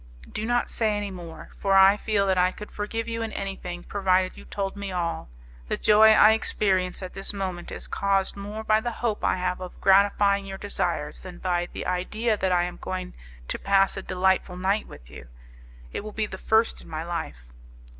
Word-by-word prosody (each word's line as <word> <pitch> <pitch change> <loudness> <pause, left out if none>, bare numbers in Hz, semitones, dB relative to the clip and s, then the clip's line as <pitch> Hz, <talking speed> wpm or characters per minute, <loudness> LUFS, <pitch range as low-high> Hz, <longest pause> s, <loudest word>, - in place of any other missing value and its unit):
"Do 215 +1 -3
not 240 0 +1
say 215 -2 +1
any 205 -1 -3
more; 175 -3 -9
for 195 -1 +2
I 195 +1 +8
feel 210 -1 0
that 190 -1 +2
I 180 +1 +4
could 210 +2 -10
forgive 225 +2 -3
you 230 0 -3
in 225 -1 -3
anything, 180 -3 -5
provided 185 -2 +1
you - - -12
told 195 -1 -3
me 200 -1 -5
all. 170 - -3 0.4
The - - -1
joy 215 +1 +6
I 215 0 +7
experience 190 -4 0
at 185 - -7
this 195 +2 -5
moment 185 -3 -4
is - - -6
caused 195 -1 0
more 205 +2 -6
by 215 0 +3
the 240 - -2
hope 230 -2 -2
I - - +2
have 180 0 -2
of 185 - -8
gratifying 200 0 +4
your 195 0 -6
desires 180 -7 -2
than 180 -2 -9
by 175 -1 -1
the - - -6
idea 215 +5 0
that 190 -2 -1
I 175 -1 +3
am 175 0 -4
going 185 -1 -5 0.3
to - - -3
pass 195 0 +3
a 195 - -4
delightful 185 -1 0
night 195 +3 0
with - - -13
you. - - -11 0.7
It - - -4
will 215 0 -7
be 220 - 0
the 190 -2 -8
first 220 +1 +2
in - - -14
my 155 0 -4
life." - - -6
195 Hz, 205 wpm, -26 LUFS, 180-210 Hz, 0.7 s, I